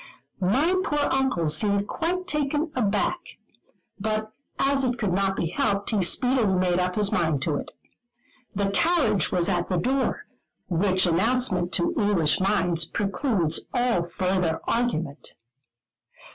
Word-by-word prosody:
My 260 - +2
poor 295 -5 0
Uncle 265 -12 +1
seemed 200 +6 +1
quite 360 +2 -2
taken 300 -1 -1
aback; 215 - 0 0.8
but 215 +1 -2 0.3
as 275 0 +2
it 250 -1 0
could 205 -6 -1
not 195 +1 +1
be 165 - -2
helped, 200 +3 -1
he 210 -3 +1
speedily 240 0 +2
made 180 -1 +1
up 180 0 -1
his 205 -2 0
mind 160 -6 0
to 150 -2 0
it. - - -6 0.9
"The 200 0 0
carriage 225 - +2
was 175 -2 +2
at 175 -3 0
the 185 - -1
door;" 260 +9 -1 0.4
which 185 +2 +1
announcement 185 0 +1
to 340 - +1
English 205 - +2
minds 180 -4 +1
precludes 195 - -1
all 245 -6 +2
further 175 -1 -1
argument. 170 -12 -2
200 Hz, 135 wpm, -25 LUFS, 175-250 Hz, 0.9 s, My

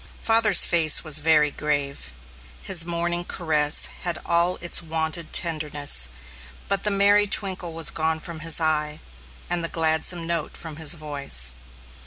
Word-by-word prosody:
Father's 225 -3 +3
face 165 -3 +4
was 155 -2 +4
very 150 -1 +1
grave. 140 - -4 0.5
His 170 -3 +3
morning 175 0 -3
caress 155 -4 +1 0.2
had 175 -2 -1
all 170 +1 0
its 175 0 -4
wonted 160 0 -4
tenderness, 150 - +2 0.6
but 200 -1 -2
the 210 - +2
merry 205 +1 +2
twinkle 190 -4 -2
was 165 -1 +2
gone 160 0 -3
from 165 0 -9
his 165 +1 +3
eye, 150 -1 -2 0.5
and 175 -1 -2
the 165 - -4
gladsome 165 +1 0
note 165 -2 -5
from 160 -2 -10
his 160 +1 +2
voice. 140 - 0
160 Hz, 145 wpm, -22 LUFS, 150-175 Hz, 0.6 s, face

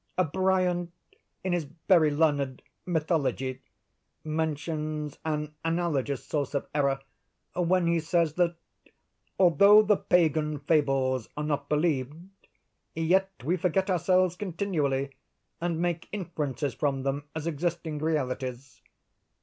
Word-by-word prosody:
Bryant, 185 -2 +1 0.5
in 185 -1 0
his 170 -4 -1 0.2
very 165 -5 +6
learned 145 -3 +1 0.2
'Mythology,' 155 -6 -1 0.6
mentions 155 -1 -3
an 150 -1 -2
analogous 165 -5 -1
source 145 -2 -2
of 140 - -1
error, 140 -2 +1 0.5
when 180 0 +2
he 170 0 +2
says 165 -1 +1
that 175 0 +1 0.8
'although 200 +4 +7
the 210 -1 +3
Pagan 155 -3 +2
fables 135 -5 +1
are 150 - -2
not 145 -2 -2
believed, 150 -3 +1 0.8
yet 180 +4 +2 0.2
we 170 +5 +2
forget 190 +3 +1
ourselves 185 0 +2
continually, 160 -8 -1 0.5
and 170 -1 -1
make 175 -1 -2
inferences 150 - -3
from 135 -3 -1
them 140 +1 -2
as 160 -1 -4
existing 165 -1 -2
realities. 130 -4 -3
155 Hz, 110 wpm, -28 LUFS, 145-175 Hz, 0.8 s, although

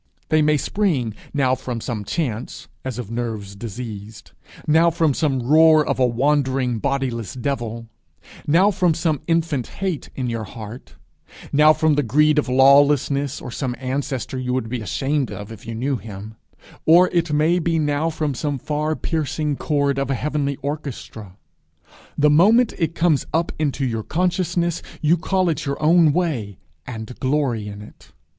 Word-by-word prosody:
They 155 0 +3
may 150 0 +3
spring 145 - 0 0.2
now 135 -3 +1
from 125 -2 -4
some 110 -2 -4
chance, 120 - -4 0.2
as 130 -2 -4
of 120 -3 -6
nerves 110 -4 -4
diseased; 110 -1 -8 0.3
now 160 +2 +4
from 160 -3 +1
some 135 -4 0
roar 155 +3 +5
of - - -1
a 125 - +4
wandering 130 -1 +1
bodiless 130 -6 -2
devil; 120 -3 -3 0.6
now 180 +7 +4
from 180 -4 +1
some 160 -4 0
infant 165 -6 0
hate 190 -6 -4
in 130 -2 -2
your 115 -2 -3
heart; 110 +3 -10 0.6
now 150 +2 +7
from 155 0 +2
the 145 - +2
greed 150 +5 +3
or 140 - -2
lawlessness 140 +1 +4
of 125 - -7
some 130 -3 -3
ancestor 130 0 -3
you 125 0 -2
would 115 -3 -2
be 125 -1 -3
ashamed 135 +5 -1
of 105 +2 -7
if 110 0 -11
you 115 - -5
knew 130 +4 -1
him; 105 0 -9 0.5
or 175 +3 +7
it 170 -3 0
may 155 +4 +2
be 165 -1 0
now 150 +1 0
from 155 -3 -2
some 145 +2 -2
far 150 +4 -2
piercing 155 -2 -2
chord 140 -1 0
of 140 - -2
a 135 - +1
heavenly 145 0 -1
orchestra: 130 -9 -6 0.8
the 150 0 +4
moment 215 +10 +5
it 165 -1 -1
comes 165 -4 +2
up 165 +1 +1
into 145 -3 0
your 115 -3 -2
consciousness, 175 - -1 0.2
you 155 +2 +3
call 185 +2 0
it 155 -4 -1
your 140 - -2
own 160 0 +5
way, 140 - -2 0.3
and 115 0 -7
glory 130 -6 0
in 105 0 -8
it! - - -17
140 Hz, 165 wpm, -21 LUFS, 120-155 Hz, 0.8 s, now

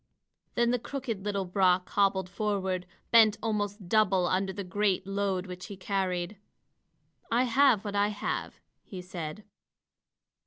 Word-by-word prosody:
Then 235 0 +3
the 245 - +1
crooked 235 -6 -5
little 200 -2 -1
Brock 185 0 +2
hobbled 195 -2 +2
forward, 190 -2 -2 0.2
bent 220 -2 +6
almost 205 -3 -2
double 195 -2 +3
under 190 +2 0
the 200 +1 -5
great 195 0 0
load 195 -1 -1
which 180 -1 -8
he 200 -3 -8
carried. 190 -1 -2 0.9
"I 240 +2 +4
have 255 -4 +4
what 205 - -3
I 205 0 +3
have," 210 -1 -3 0.3
he 190 - -8
said. 175 +1 -6
200 Hz, 140 wpm, -29 LUFS, 185-215 Hz, 0.9 s, bent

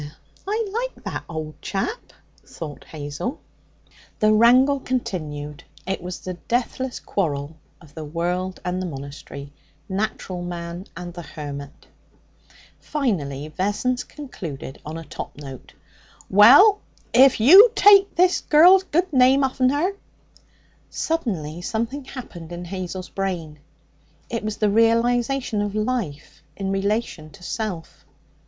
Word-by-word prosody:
'Eh, 145 - -7 0.4
I 435 +2 -1 0.3
like - - -21
that - - -5
old 155 -2 -6
chap,' 315 - -4 0.3
thought 150 -4 -9
Hazel. 150 - -5 0.8
The 215 0 +4
wrangle 255 +5 +5
continued. 155 - -4 0.2
It 190 0 -3
was 180 +1 -6
the 185 - -5
deathless 245 +6 -2
quarrel 150 -5 -2 0.2
of 155 -4 -18
the 160 - -7
world 175 +4 -3
and 180 +1 -1
the 185 - -3
monastery 140 -1 -8 0.3
natural 190 -2 -3
man 175 +1 -6
and 175 -1 -7
the 175 - -7
hermit. 145 -2 -8 0.9
Finally 155 - -2
Vessons 205 +9 -1
concluded 165 - -8
on 155 +2 -6
a 165 - -7
top 150 - -8
note. 135 -3 -10 0.6
'Well, 285 - +8 0.3
if 260 0 +6
you 375 - +9
take 400 -1 +6
this 365 +1 +3
girl's 355 +5 +7
good 360 -1 -1
name 260 +1 +5
off'n 260 -1 +2
her 300 +8 +1 0.6
' - - -35 0.2
Suddenly 180 - -2
something 235 +8 -3
happened 175 -12 -9
in 175 0 -6
Hazel's 185 0 -5
brain. 175 -6 -4 0.7
It 230 -2 -2
was 215 0 -3
the 210 -2 +2
realization 230 +1 +2
of 205 0 -3
life 195 - -3 0.2
in 195 -1 -2
relation 195 -5 -2
to 180 +3 -16
self. 195 -6 -5
195 Hz, 130 wpm, -23 LUFS, 160-255 Hz, 0.9 s, you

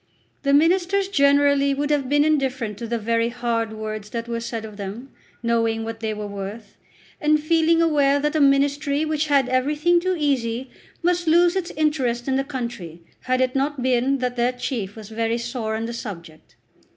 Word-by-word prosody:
The 280 - +1
ministers 365 +6 +3
generally 280 -3 +3
would 290 +1 -1
have 280 -3 0
been 290 +1 +3
indifferent 260 -8 0
to 235 - -5
the 235 +1 -1
very 230 +1 0
hard 235 -2 -2
words 215 -1 -6
that 230 +1 -5
were 235 0 -2
said 230 -1 -5
of 215 -1 -10
them, 210 +7 -7 0.3
knowing 230 -1 +1
what 225 0 -6
they 220 -1 -2
were 210 -1 -5
worth, 200 +1 -7 0.5
and 305 0 +3
feeling 330 +2 +3
aware 285 -3 +3
that 295 +2 -1
a 310 - +2
ministry 280 +2 +2
which 310 0 -1
had 280 -3 +3
everything 295 +7 +2
too 370 +1 0
easy 255 -4 -1 0.3
must 350 0 +1
lose 345 +2 +4
its 370 -2 -2
interest 265 -6 0
in 265 - +1
the 270 - +1
country, 235 - -6 0.2
had 255 0 +1
it 255 0 +1
not 275 -1 -1
been 260 +2 +2
that 250 -1 -3
their 240 +1 +1
chief 235 -6 -4
was 220 -2 -10
very 225 +1 -1
sore 235 -2 -3
on 225 +1 -3
the 235 - -5
subject. 170 -9 -9
255 Hz, 190 wpm, -23 LUFS, 230-295 Hz, 0.5 s, lose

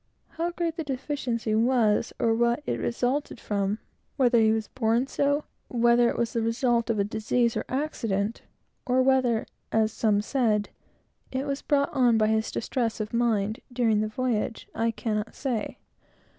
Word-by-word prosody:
How 335 +1 -2
great 340 -1 -3
the 325 - -2
deficiency 260 -5 -2
was, 225 -2 +2
or 225 - +2
what 235 +5 +1
it - - -2
resulted 250 +2 -1
from; 200 -1 -1 0.4
whether 245 -3 +4
he 220 -1 +4
was 220 -1 -1
born 235 0 +1
so; 285 +2 0 0.2
whether 240 0 +4
it - - -3
was 235 -1 -1
the 230 - 0
result 235 0 +1
of 205 -3 +1
disease 225 +2 0
or - - -2
accident; 230 -7 -2 0.5
or 255 +1 +3
whether, 255 -4 +2 0.3
as 220 0 +2
some 210 -2 +1
said, 215 -3 +1 0.6
it 265 +1 -2
was 275 -1 -2
brought 280 -1 +1
on 245 -4 +4
by 215 -1 +3
his 220 0 +1
distress 230 -1 -2
of 215 +1 -4
mind, 225 -1 +1
during 230 -4 +2
the 215 - 0
voyage, 225 -1 -2
I 230 0 0
cannot 215 -1 -3
say. 245 -6 -3
235 Hz, 160 wpm, -27 LUFS, 220-260 Hz, 0.6 s, whether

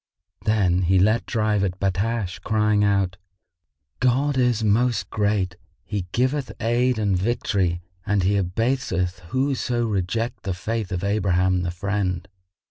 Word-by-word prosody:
Then 95 -5 +2
he 95 +2 +3
let 110 +5 +3
drive 105 -3 +1
at 95 -1 -2
Battash, 100 +1 -1
crying 105 -1 +2
out, 100 -2 +1 0.8
"God 130 +3 +2
is 125 -3 +2
Most 110 -2 +1
Great! 100 -4 0 0.3
He 100 -4 -3
giveth 130 0 0
aid 120 +2 +1
and 105 -3 +1
victory 95 -3 0 0.2
and 105 -2 +1
He 100 +3 +2
abaseth 95 -2 0
whoso 130 -1 0
reject 110 +3 -2
the 95 -4 -3
Faith 110 +2 -3
of 90 0 -2
Abraham 95 -3 +2
the 90 - -2
Friend!" 90 0 -2
105 Hz, 130 wpm, -23 LUFS, 95-115 Hz, 0.8 s, he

